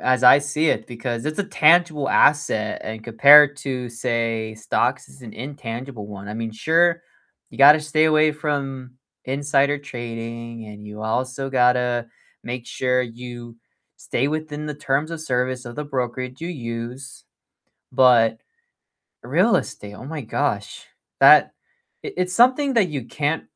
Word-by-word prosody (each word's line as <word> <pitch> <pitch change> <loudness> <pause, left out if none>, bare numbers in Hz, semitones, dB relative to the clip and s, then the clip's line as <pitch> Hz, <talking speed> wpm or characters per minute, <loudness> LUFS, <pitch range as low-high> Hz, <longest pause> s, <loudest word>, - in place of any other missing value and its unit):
as 130 0 +1
I 125 +3 +8
see 150 +2 -1
it, - - -2
because 120 +1 -5
it's 155 +5 -4
a 205 - 0
tangible 155 -4 +3
asset 110 -7 +2
and 110 0 -7
compared 140 +5 +7
to, 125 -4 -5
say, 115 -2 -2
stocks 110 -1 -1
is 65 - -16
an 115 -3 -11
intangible 125 -3 -7
one, 100 -1 -10
I 105 - -6
mean, 115 0 -4
sure, 165 +8 +1 0.5
you - - -14
gotta 145 +3 +8
stay 155 +1 +1
away 155 0 +3
from 140 -4 -4 0.3
insider 140 +1 +1
trading, 115 -3 -7
and 105 0 -11
you 105 +1 -9
also 130 +4 -3
gotta 125 -2 +1 0.4
make 120 0 -6
sure 125 0 0
you 120 0 -9 0.4
stay 130 - -2
within 150 0 -4
the 150 - -5
terms 145 +2 -2
of 165 - -6
service 125 -3 -2
of 120 -1 -9
the 150 - -4
brokerage 130 -1 -4
you 165 - -5
use, 125 -2 -7 0.7
but 115 -3 +4 0.9
real 235 - +2
estate, 105 -8 -6
oh 120 - -11
my 150 +2 -6
gosh, 110 - -3 0.4
that - - +8 0.6
i - - -5
it's 180 0 -1
something 260 +3 +3
that 210 -6 +3
you 140 -5 -5
can't 150 +5 -2
130 Hz, 150 wpm, -22 LUFS, 115-150 Hz, 0.9 s, I